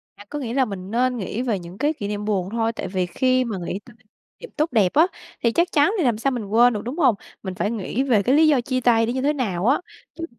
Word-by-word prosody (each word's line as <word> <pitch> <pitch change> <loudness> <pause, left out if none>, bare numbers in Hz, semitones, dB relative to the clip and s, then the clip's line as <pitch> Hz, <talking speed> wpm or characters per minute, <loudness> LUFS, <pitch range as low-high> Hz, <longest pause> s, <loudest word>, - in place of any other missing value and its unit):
À, 205 - -14
có 295 - -4
nghĩa 240 -4 -4
là 265 0 +3
mình 195 -3 -7
nên 250 +2 +1
nghĩ 215 +2 -3
về 230 -7 -1
những 175 +2 -11
cái 295 +5 +1
kỷ 205 -8 -5
niệm 210 0 -4
buồn 195 -3 -1
thôi, 225 0 0
tại 190 - -5
vì 185 -1 -1
khi 255 +8 +1
mà 215 -4 -4
nghĩ 190 - -3
tới 240 -3 -16 0.4
niệm 485 - -10
tốt 305 +2 +1
đẹp 205 -6 +2
á 320 +4 +5 0.4
thì 235 - +3
chắc 340 +8 +1
chắn 290 +5 +4
thì 350 - +1
làm 240 -5 +2
sao 270 +5 0
mình 235 -5 -3
quên 235 +4 +4
được, 210 - -3
đúng 255 +8 -5
hông? 265 -9 +4 0.3
Mình 190 -1 -5
phải 205 - -1
nghĩ 230 +3 -2
về 230 -7 +2
cái 260 +6 +3
lý 315 +1 +5
do 280 -5 +4
chia 255 0 -2
tay 230 -2 +4
nó 235 - -2
như 260 - -2
thế 295 +2 +2
nào 200 -10 -2
á, 270 - +4 0.4
chứ 330 - -5
235 Hz, 290 wpm, -22 LUFS, 205-270 Hz, 0.4 s, á